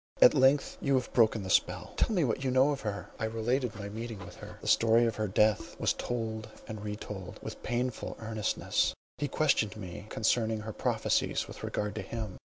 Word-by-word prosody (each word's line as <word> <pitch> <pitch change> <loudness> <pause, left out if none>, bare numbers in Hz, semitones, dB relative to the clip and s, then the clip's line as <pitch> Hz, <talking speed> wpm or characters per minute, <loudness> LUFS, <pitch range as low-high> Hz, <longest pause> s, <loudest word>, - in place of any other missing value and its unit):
At - - +8
length 135 0 +3
you 140 -1 +2
have 130 -1 -1
broken 110 -3 +4
the 95 - -3
spell; - - +1
tell - - +1
me 185 -6 +2
what 130 0 0
you 130 - +1
know 130 +3 +4
of 140 - -3
her." 105 -2 -4
I 110 - 0
related 115 +2 0
my 100 -1 -6
meeting 115 +2 -5
with - - -11
her; - - -10
the - - -9
story 115 +1 +5
of 115 - -1
her 110 0 0
death 105 +2 +2
was - - +2
told 110 -3 -3 0.2
and 110 -1 -6
re 105 0 -3
told. 95 -4 -7
With - - -7
painful 125 0 -2
earnestness 110 -2 0 0.2
he 145 - 0
questioned 135 -8 +1
me 95 +1 -7
concerning 110 0 +1
her 110 0 -6
prophecies - - 0
with - - -10
regard 105 0 -2
to 110 - -4
him. 105 0 -5
110 Hz, 205 wpm, -31 LUFS, 105-125 Hz, 0.2 s, At